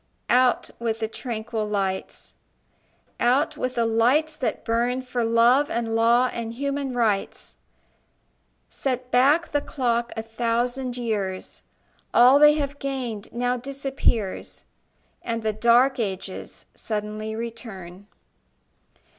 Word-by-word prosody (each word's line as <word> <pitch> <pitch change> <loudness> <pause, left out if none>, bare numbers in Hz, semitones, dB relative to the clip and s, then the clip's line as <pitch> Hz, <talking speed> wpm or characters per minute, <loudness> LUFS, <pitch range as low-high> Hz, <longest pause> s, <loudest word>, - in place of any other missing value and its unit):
Out 250 0 +3
with 225 -1 -2
the 220 - -1
tranquil 220 -2 -4
lights, 195 -2 -3 0.9
Out 260 +6 +2
with 255 0 -3
the 235 -1 +1
lights 250 +8 +2
that 260 - -3
burn 240 +3 0
For 250 -1 -2
love 235 +5 +4
and 230 -1 -2
law 235 +2 +3
and 230 -1 -5
human 280 0 -2
rights! 215 -5 -1 1.1
Set 255 -2 -3
back 285 +7 +4
the 290 - 0
clock 240 -4 -1
a 225 - -2
thousand 240 +3 -1
years: 205 -6 -3 0.5
All 255 +4 +7
they 295 0 +8
have 285 -1 -3
gained 255 -7 -4
now 245 +1 -1
disappears, 265 -6 -2 0.6
And 230 -1 -3
the 215 -1 0
dark 240 +4 +4
ages 190 -3 -5
suddenly 215 0 -4
return. 205 -5 -8
235 Hz, 115 wpm, -24 LUFS, 225-255 Hz, 1.1 s, they